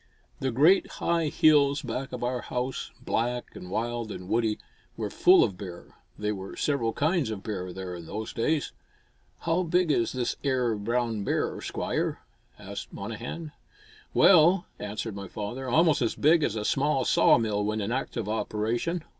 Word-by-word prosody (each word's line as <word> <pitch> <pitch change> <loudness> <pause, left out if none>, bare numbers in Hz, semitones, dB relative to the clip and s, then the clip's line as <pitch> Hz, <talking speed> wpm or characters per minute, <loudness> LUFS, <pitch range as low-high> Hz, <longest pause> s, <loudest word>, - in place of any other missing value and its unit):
The 135 - 0
great 150 +11 +4
high 170 -2 0
hills 145 -1 +4
back 130 +2 -4
of 125 -1 -5
our 125 0 -1
house, 125 +2 -3 0.2
black 120 +2 -1
and 90 - -9
wild 115 +2 -2
and 90 - -7
woody, 110 0 +1 0.4
were - - -3
full - - +6
of 90 - -2
bear. 90 -3 -9 0.2
There 105 0 -1
were 95 -1 -7
several 130 -6 0
kinds 155 -2 +1
of 105 -3 -5
bear 95 -4 -4
there 95 0 -6
in 85 -2 -8
those 110 +4 -5
days. 150 +6 0 0.7
"How 165 +2 +1
big 175 -1 +2
is 115 -5 +1
this 125 -2 -2
ere 130 -4 +1
brown 115 0 -1
bear, - - -1
Squire?" - - -2 0.4
asked - - -8
Monnehan. 165 -2 -6 0.6
"Well," 175 0 +6
answered 105 +1 -4
my 100 -1 -6
father, 120 +7 -5
"almost 155 +3 +4
as 115 - 0
big 160 +3 +4
as 115 -7 0
a 105 -1 -3
small 135 0 +1
sawmill 105 -3 +3
when 105 +1 -1
in 105 +2 -2
active 120 -4 -2
operation." 115 +9 -1
120 Hz, 165 wpm, -27 LUFS, 105-145 Hz, 0.7 s, full